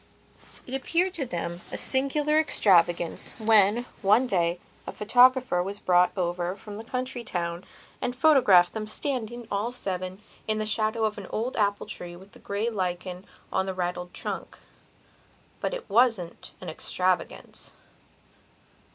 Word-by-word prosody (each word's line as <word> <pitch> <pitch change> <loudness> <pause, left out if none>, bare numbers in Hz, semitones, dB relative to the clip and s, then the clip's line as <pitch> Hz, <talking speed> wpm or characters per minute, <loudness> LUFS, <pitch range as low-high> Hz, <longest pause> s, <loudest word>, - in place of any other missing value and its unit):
It 255 - -9
appeared 340 +7 0
to 280 -8 -3
them 170 -2 -4
a - - -3
singular 295 +3 +3
extravagance 175 - +2
when, 220 0 +4 0.2
one 210 +6 +4
day, 175 -6 +1 0.3
a - - -3
photographer 245 -2 +4
was 195 +3 -4
brought 180 -2 +3
over 175 0 -1
from 205 +1 -10
the 220 - -7
county 255 0 -4
town 170 -3 -3 0.4
and 245 - -2
photographed 245 - +5
them 215 -1 -4
standing, 240 -1 -3
all 205 +4 -1
seven, 185 -5 -4 0.3
in 215 0 0
the 215 - -1
shadow 220 +1 0
of 215 -1 -2
an - - -9
old 235 +4 -3
apple 205 -2 0
tree 175 -4 -8
with 190 +3 -15
the - - -17
grey 200 +3 -2
lichen 185 -3 -3 0.3
on 190 0 +1
the 190 - -3
raddled 180 0 -3
trunk. - - -6 1.0
But - - -2
it - - -6
wasn't 225 -6 +1
an 185 - -8
extravagance. 180 +2 -3
210 Hz, 145 wpm, -26 LUFS, 180-245 Hz, 1.0 s, photographed